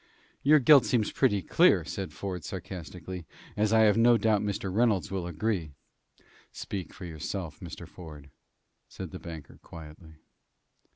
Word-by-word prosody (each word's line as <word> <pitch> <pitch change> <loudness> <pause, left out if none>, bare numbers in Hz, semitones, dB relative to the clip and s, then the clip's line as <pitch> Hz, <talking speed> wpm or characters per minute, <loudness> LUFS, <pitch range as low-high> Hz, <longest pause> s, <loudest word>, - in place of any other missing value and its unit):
"Your 150 +2 +6
guilt 140 -1 +7
seems 115 -4 +1
pretty 105 -8 +1
clear," - - +4
said 95 -5 -5
Ford, 90 0 -5
sarcastically; 90 -1 -7 0.3
"as 105 0 +1
I 110 0 +5
have 110 -1 +5
no 120 0 +6
doubt 110 -3 +2
Mr. 100 -2 -3
Reynolds 105 -7 +2
will 95 -3 -3
agree." 85 -3 -2 0.8
"Speak 95 -5 -6
for 90 - -10
yourself, 85 +1 -5
Mr. - - -9
Ford," 75 -5 -12 0.6
said - - -8
the - - -7
banker, 80 -4 -10
quietly. 80 0 -12
95 Hz, 140 wpm, -28 LUFS, 80-110 Hz, 0.8 s, guilt